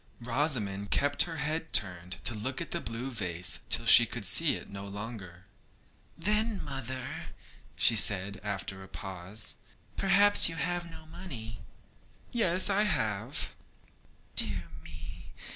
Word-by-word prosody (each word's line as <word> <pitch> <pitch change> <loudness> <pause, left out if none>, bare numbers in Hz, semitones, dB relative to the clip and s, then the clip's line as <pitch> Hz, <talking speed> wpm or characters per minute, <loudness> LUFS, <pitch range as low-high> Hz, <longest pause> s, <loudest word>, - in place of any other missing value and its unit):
Rosamond 115 -6 -1
kept 145 0 +3
her 165 - -5
head 155 +2 -3
turned 90 -2 +2
to 120 - +3
look 125 +5 -4
at - - -6
the - - -3
blue 115 +4 -5
vase 90 -6 -2
till - - +2
she - - +9
could - - -6
see - - +4
it - - -9
no 100 0 -9
longer. 100 -3 -9 0.7
'Then, 215 0 0
mother,' 130 -2 -5 0.5
said 100 -3 +4
she, - - -17
after 95 -2 -5
a 95 - -11
pause, 95 +2 -3 0.4
'perhaps 200 0 +5
you 165 - -6
have 175 +1 -3
no 160 -1 -13
money.' 155 -10 -9 0.7
'Yes, 185 -6 +3
I 200 0 +3
have.' 110 - -2 0.8
'Dear 100 -5 +1 0.2
me! 80 +2 -12
115 Hz, 135 wpm, -29 LUFS, 100-160 Hz, 0.8 s, she